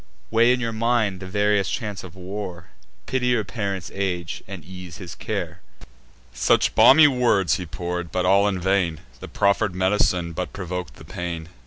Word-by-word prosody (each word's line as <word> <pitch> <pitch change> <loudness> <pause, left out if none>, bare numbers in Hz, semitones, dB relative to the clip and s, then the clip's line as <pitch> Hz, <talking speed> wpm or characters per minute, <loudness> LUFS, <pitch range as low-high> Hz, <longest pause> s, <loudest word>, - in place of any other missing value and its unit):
Weigh 115 +2 +5
in 125 - +2
your 115 -2 -2
mind 110 -4 +1
the 95 - -8
various 105 0 +1
chance 105 -8 -4
of 90 -2 -11
war; 90 -2 -7 0.4
Pity 130 -1 -1
your 120 -3 +2
parent's 95 -3 -4
age, 90 -4 -3
and 95 -5 -8
ease 90 -1 -9
his 90 -3 -8
care." - - -4 0.7
Such 60 - +2
balmy 150 +3 +8
words 120 -9 +2
he 90 -3 -6
pour'd, 85 +1 -4
but 90 0 0
all 100 +2 +4
in 95 -3 -1
vain: 90 -3 0 0.2
The - - -8
proffer'd 100 -1 +1
med'cine 95 -2 +1
but 90 +2 -4
provok'd 90 -7 -5
the - - -13
pain. 85 -2 -5
95 Hz, 170 wpm, -23 LUFS, 90-105 Hz, 0.7 s, balmy